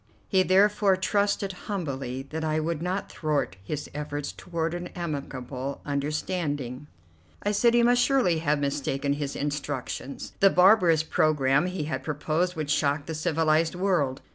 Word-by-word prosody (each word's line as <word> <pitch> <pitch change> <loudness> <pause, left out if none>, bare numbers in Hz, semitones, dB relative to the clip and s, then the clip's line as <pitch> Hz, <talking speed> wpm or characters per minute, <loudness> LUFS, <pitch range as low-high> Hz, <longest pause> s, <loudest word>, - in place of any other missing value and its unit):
He 190 -2 +3
therefore 195 +1 +4
trusted 200 0 0 0.2
humbly 135 -9 -3
that 160 +1 -3
I 155 0 0
would 160 0 -2
not 185 +3 -2
thwart 150 - -1
his 150 +8 -4
efforts 145 -1 -4
toward 165 -2 -3
an 175 0 -4
amicable 140 -5 -4
understanding. 145 -2 -2 0.6
I 205 - +1
said 235 +3 +3
he 240 - +5
must 245 +1 +4
surely 245 - +3
have 150 -2 +1
mistaken 140 0 -1
his 145 -1 -4
instructions; 145 -2 -4
the 195 - +7
barbarous 180 -4 +5
programme 150 -1 +2
he 180 -3 -3
had 135 -3 -3
proposed 155 +5 -1
would 155 -2 -2
shock 145 0 +1
the 160 - -4
civilized 160 0 +1
world. 175 -8 0
155 Hz, 145 wpm, -27 LUFS, 145-180 Hz, 0.6 s, the